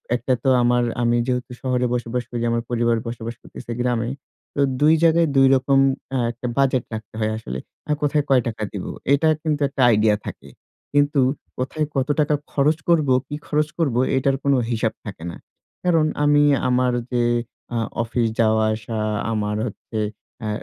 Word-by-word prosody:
একটা 125 Hz, +1 st, 0 dB
তো 135 Hz, -, +3 dB
আমার 120 Hz, 0 st, +3 dB, 0.2 s
আমি 120 Hz, 0 st, +2 dB
যেহেতু 125 Hz, -1 st, -2 dB
শহরে 125 Hz, -2 st, 0 dB
বসবাস 120 Hz, 0 st, -2 dB
করি, 120 Hz, -, -3 dB
আমার 115 Hz, 0 st, 0 dB
পরিবারে 120 Hz, -1 st, +2 dB
বসবাস 115 Hz, 0 st, -5 dB
করতেছি 120 Hz, -, -10 dB
গ্রামে 120 Hz, -2 st, 0 dB, 0.5 s
তো 140 Hz, -, +1 dB, 0.2 s
২ 155 Hz, +2 st, +6 dB
জায়গায় 165 Hz, 0 st, +4 dB
২ 135 Hz, 0 st, +6 dB
অ্যা 135 Hz, -, +5 dB
রকম 135 Hz, +1 st, +2 dB, 0.5 s
একটা 120 Hz, +1 st, -6 dB
বাজেট 130 Hz, -3 st, +2 dB
রাখতে 110 Hz, -1 st, -7 dB
হয় 110 Hz, 0 st, 0 dB
আসলে। 65 Hz, -, -5 dB, 0.3 s
আর 150 Hz, -, +3 dB
কোথায় 145 Hz, 0 st, +2 dB
কয় 130 Hz, -2 st, +5 dB
টাকা 110 Hz, -1 st, -4 dB
দিবো? 100 Hz, -, -4 dB, 0.2 s
এটা 155 Hz, +3 st, +3 dB
কিন্তু 150 Hz, -2 st, -1 dB
একটা 140 Hz, -1 st, -3 dB
idea 105 Hz, 0 st, +3 dB
থাকে। -, -, -8 dB, 0.4 s
কিন্তু 145 Hz, 0 st, +3 dB, 0.4 s
কোথায় 150 Hz, +4 st, -1 dB
কত 135 Hz, -1 st, +1 dB
টাকা 150 Hz, 0 st, +3 dB, 0.2 s
খরচ 150 Hz, +2 st, +2 dB
করবো, 155 Hz, -6 st, +4 dB
কি 145 Hz, -, -5 dB
খরচ 150 Hz, 0 st, +1 dB
করবো 135 Hz, -7 st, +1 dB, 0.2 s
এটার 135 Hz, +1 st, +1 dB
কোন 140 Hz, -, +3 dB, 0.2 s
হিসাব 110 Hz, -1 st, 0 dB
থাকে 100 Hz, -6 st, -8 dB
না। -, -, -9 dB, 0.5 s
কারণ 165 Hz, -3 st, +3 dB, 0.2 s
আমি 145 Hz, 0 st, +5 dB, 0.3 s
আমার 125 Hz, 0 st, +2 dB, 0.2 s
যে 120 Hz, -1 st, +1 dB, 0.5 s
আ -, -, +1 dB, 0.3 s
অফিস 115 Hz, 0 st, 0 dB
যাওয়া 110 Hz, -1 st, +3 dB
আসা, 110 Hz, 0 st, -5 dB, 0.3 s
আমার 105 Hz, -1 st, -1 dB
হচ্ছে 110 Hz, +1 st, -6 dB, 0.4 s
অ্যা 110 Hz, -, -3 dB
125 Hz, 170 wpm, -22 LUFS, 115-145 Hz, 0.5 s, ২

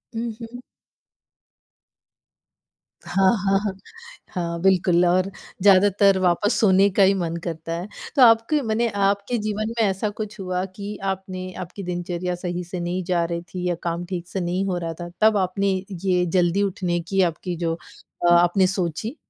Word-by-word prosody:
हुँ, 230 Hz, 0 st, -2 dB
हुँ। 235 Hz, +2 st, -8 dB, 2.4 s
हाँ, 190 Hz, -1 st, +3 dB
हाँ, 195 Hz, 0 st, +2 dB
हाँ। 205 Hz, -2 st, -3 dB, 0.6 s
हाँ, 170 Hz, -2 st, -3 dB
बिल्कुल 180 Hz, -2 st, +3 dB
और 185 Hz, +2 st, +2 dB, 0.3 s
ज़्यादातर 195 Hz, 0 st, +5 dB
वापस 185 Hz, +4 st, +2 dB
सोने 195 Hz, -1 st, +5 dB
का 200 Hz, 0 st, +3 dB
ही 190 Hz, -, +5 dB
मन 170 Hz, -3 st, -2 dB
करता 165 Hz, -1 st, -5 dB
है। 185 Hz, -, -6 dB, 0.3 s
तो 270 Hz, -, +3 dB
आपके 230 Hz, +5 st, +5 dB
मने 230 Hz, -1 st, 0 dB
आपके 200 Hz, +3 st, 0 dB
जीवन 215 Hz, +1 st, -2 dB
में -, -, +4 dB
ऐसा 195 Hz, +2 st, -1 dB
कुछ 210 Hz, 0 st, -7 dB
हुआ 185 Hz, -1 st, -2 dB
कि 205 Hz, +1 st, -6 dB
आपने 185 Hz, -1 st, -6 dB
आपकी 185 Hz, +3 st, -8 dB
दिनचर्या 175 Hz, 0 st, -3 dB
सही 175 Hz, 0 st, -4 dB
से 180 Hz, +1 st, -6 dB
नहीं 175 Hz, +2 st, -2 dB
जा 175 Hz, -1 st, +1 dB
रही 170 Hz, 0 st, -3 dB
थी 180 Hz, -1 st, -3 dB
या 175 Hz, -, 0 dB
काम 170 Hz, +1 st, -2 dB
ठीक 175 Hz, -1 st, -5 dB
से 190 Hz, -, -4 dB
नहीं 180 Hz, +3 st, -1 dB
हो 185 Hz, -2 st, -1 dB
रहा 165 Hz, -1 st, -4 dB
था, 175 Hz, -, -6 dB
तब 215 Hz, -1 st, +5 dB
आपने 195 Hz, +1 st, 0 dB, 0.4 s
ये 180 Hz, -1 st, +3 dB
जल्दी 180 Hz, +2 st, +2 dB
उठने 180 Hz, -3 st, -1 dB
की 190 Hz, +3 st, 0 dB
आपकी 175 Hz, +1 st, -1 dB
जो 165 Hz, -1 st, -1 dB, 0.5 s
अ, 175 Hz, -, +5 dB
आपने 175 Hz, +2 st, +4 dB
सोची? 190 Hz, -, -3 dB
185 Hz, 170 wpm, -23 LUFS, 175-200 Hz, 2.4 s, ज़्यादातर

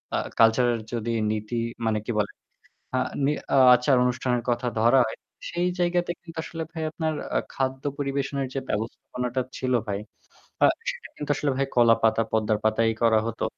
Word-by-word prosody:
আ -, -, +2 dB, 0.2 s
cultural 115 Hz, +1 st, +4 dB
যদি 115 Hz, 0 st, -2 dB, 0.2 s
নীতি 110 Hz, +2 st, -3 dB, 0.3 s
মানে 110 Hz, -1 st, +1 dB
কি -, -, 0 dB
বলে? 100 Hz, -, 0 dB, 0.7 s
আ -, -, +2 dB, 0.3 s
নি 140 Hz, -, +3 dB, 0.4 s
আচার 125 Hz, +2 st, +3 dB
অনুষ্ঠানের 125 Hz, -1 st, 0 dB
কথা 120 Hz, +1 st, -1 dB
ধরা 120 Hz, +4 st, +5 dB
হয়। 110 Hz, -, -5 dB, 0.3 s
সেই 175 Hz, +1 st, 0 dB
জায়গাতে 175 Hz, 0 st, +1 dB
কিন্তু 165 Hz, -1 st, -10 dB
আসলে 165 Hz, 0 st, -5 dB
ভাই 165 Hz, -2 st, -5 dB
আপনার 160 Hz, 0 st, -2 dB, 0.2 s
আ -, -, +5 dB, 0.2 s
খাদ্য 130 Hz, 0 st, -2 dB
পরিবেশনের 140 Hz, -1 st, -1 dB
যে 135 Hz, -, -1 dB
ব্যবস্থাপনাটা 125 Hz, +3 st, -3 dB, 0.2 s
ছিল 130 Hz, -1 st, -1 dB
ভাই। 100 Hz, -2 st, -2 dB, 0.6 s
আ -, -, +8 dB, 0.3 s
সেটা -, -, -9 dB
কিন্তু 150 Hz, -, -6 dB
আসলে 145 Hz, -, 0 dB
ভাই 135 Hz, -, +1 dB
কলাপাতা, 115 Hz, -1 st, +4 dB
পদ্মার 110 Hz, -1 st, +1 dB
পাতা 110 Hz, +1 st, +2 dB
এই -, -, -2 dB
করা 115 Hz, -1 st, +5 dB
হতো। 115 Hz, 0 st, -3 dB
125 Hz, 170 wpm, -25 LUFS, 115-140 Hz, 0.7 s, আ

